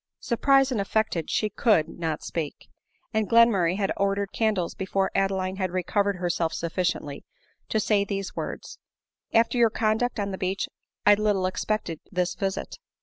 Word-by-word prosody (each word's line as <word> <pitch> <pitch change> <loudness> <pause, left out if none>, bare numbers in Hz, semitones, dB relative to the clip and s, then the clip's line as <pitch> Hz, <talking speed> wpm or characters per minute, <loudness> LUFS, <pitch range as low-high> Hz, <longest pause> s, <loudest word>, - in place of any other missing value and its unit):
Surprised 270 +3 +3
and 225 -5 0
affected, 200 -5 -1
she 215 - +1
could, 205 -6 +2
not 160 -2 -4
speak; 155 -4 -5 0.5
and 220 -1 0
Glenmurray 220 -7 +5
had 195 -2 0
ordered 200 0 0
candles 210 -6 0
before 190 0 -1
Adeline 190 -1 0
had 190 -2 -1
recovered 200 +3 0
herself 175 -2 -1
sufficiently 170 -4 -2 0.5
to 220 - +1
say 205 -1 +2
these 195 -1 -4
words, - - -6 0.3
" - - -67
After 230 +2 +3
your 230 -1 +6
conduct 220 +2 0
on 200 -1 -1
the 190 - -5
beach, 190 +1 -1 0.4
I 205 - +8
little 205 -2 +1
expected 185 -3 -2
this 180 -2 0
visit." 195 -1 -4
195 Hz, 155 wpm, -26 LUFS, 180-215 Hz, 0.5 s, I